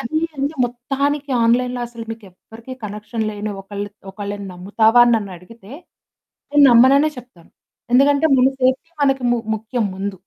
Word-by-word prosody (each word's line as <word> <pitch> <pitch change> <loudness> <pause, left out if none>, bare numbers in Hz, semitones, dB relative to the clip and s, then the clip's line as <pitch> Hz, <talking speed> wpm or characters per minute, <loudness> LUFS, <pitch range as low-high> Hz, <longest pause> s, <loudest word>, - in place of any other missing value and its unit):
అది 275 +7 -2 0.2
అండి. 280 +3 -2
మొత్తానికి 275 +4 -3
ఆన్‌లైన్‌లో 245 +1 +1
అసలు 235 -1 -9
మీకెవ్వరికీ 225 +3 -11
కనెక్షన్ 210 +2 -5
లేని 210 0 -5
ఒకళ్ళు 205 +1 -6 0.2
ఒకళ్ళని 200 0 -6
నమ్ముతావా 220 +6 +2
అని 240 - +3
నన్నడిగితే, 200 +2 -9 0.8
నేను 290 0 +5
నమ్మననే 270 +6 +5
చెప్తాను. 240 -9 -16 0.4
ఎందుకంటే 280 +4 +4
మన 255 0 +4
సేఫ్టీ 260 +5 0
మనకి 270 -2 +1
ము 240 - +1 0.2
ముఖ్యం 225 +1 -3
ముందు. 195 0 -5
235 Hz, 135 wpm, -19 LUFS, 205-260 Hz, 0.8 s, నేను